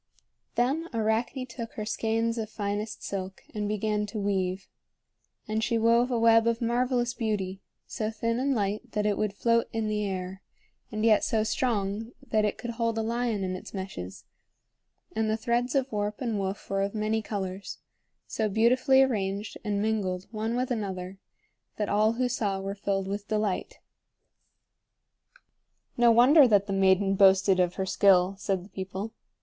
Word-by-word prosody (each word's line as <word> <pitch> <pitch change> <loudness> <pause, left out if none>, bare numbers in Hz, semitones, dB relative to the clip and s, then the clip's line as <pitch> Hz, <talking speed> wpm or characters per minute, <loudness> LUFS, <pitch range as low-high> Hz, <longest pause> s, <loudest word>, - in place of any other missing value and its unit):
Then 280 +8 +1
Arachne 225 +4 0
took 235 -2 -7
her 215 - -5
skeins 225 +1 0
of 215 -1 -4
finest 210 0 -4
silk 190 -1 -5
and 210 -1 -2
began 210 0 -1
to 205 - -6
weave. 195 -2 -1 0.8
And 215 +1 -1
she 235 0 +1
wove 230 +2 +3
a 245 - 0
web 225 0 +5
of 230 0 +1
marvelous 240 0 0
beauty, 200 -4 -2 0.2
so 215 -1 -3
thin 230 +2 -1
and 275 +1 +1
light 210 +3 -2
that 210 -1 0
it 210 -1 +2
would 210 -1 -2
float 230 +2 +2
in 225 -1 -2
the 210 0 -1
air, 190 -1 -4 0.5
and 215 +1 -1
yet 215 -2 +5
so 220 -2 +1
strong 220 -2 -1
that 215 -1 +2
it 210 - -1
could 240 - -5
hold 230 -1 -1
a 225 - 0
lion 230 -2 -1
in 185 0 -2
its 185 - -9
meshes; 95 - -6 0.9
and 220 0 +1
the 220 - +1
threads 240 +3 0
of 270 -1 +1
warp 210 0 -2
and 230 -5 -1
woof 195 +1 -4
were 195 0 0
of 200 +2 -2
many 215 +1 0
colors, 195 -2 -5 0.5
so 220 -1 -1
beautifully 255 +5 +4
arranged 205 -4 -2
and 205 -1 -1
mingled 195 -4 -1
one 220 +1 -2
with 250 +1 -1
another 190 -4 -4 0.6
that 210 -2 -2
all 215 +2 +3
who 250 +2 0
saw 205 -5 -1
were 195 +1 -4
filled 195 -1 -2
with 200 +1 -4
delight. 210 -3 -1 2.2
"No 240 0 +5
wonder 255 +5 +7
that 205 -3 +4
the 200 - -3
maiden 195 0 +3
boasted 190 -1 +5
of 180 -1 +1
her 190 - -1
skill," 190 -1 +4
said 190 -3 -1
the - - -16
people. 190 +3 -5
215 Hz, 170 wpm, -28 LUFS, 195-230 Hz, 2.2 s, wonder